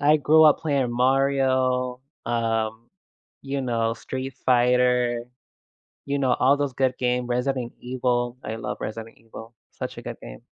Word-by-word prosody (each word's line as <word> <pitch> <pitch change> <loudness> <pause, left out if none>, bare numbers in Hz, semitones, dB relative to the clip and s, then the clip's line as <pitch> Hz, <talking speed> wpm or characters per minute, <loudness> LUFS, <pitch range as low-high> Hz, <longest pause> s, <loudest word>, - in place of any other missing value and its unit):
uh, - - -4
i 150 - +6
I - - +6
grew 155 +2 +5
up 150 - +6
playing 140 -6 0
Mario, 130 0 +1 0.3
um, 115 -1 -1 0.5
you 140 0 -3
know, 115 -3 0
Street 130 +2 -6
Fighter, 125 -1 +3 0.8
you 140 0 -1
know, 130 -3 +2
all 135 +3 +3
those 145 -2 -2
good 130 0 0
games, 125 0 0
Resident 125 0 -1
Evil- 125 -1 -1
I 110 - -4
love - - -5
Resident 115 +1 -6
Evil, 115 +1 -12 0.2
such - - -6
a - - -8
good - - -7
game. - - -11
125 Hz, 160 wpm, -24 LUFS, 120-135 Hz, 0.8 s, i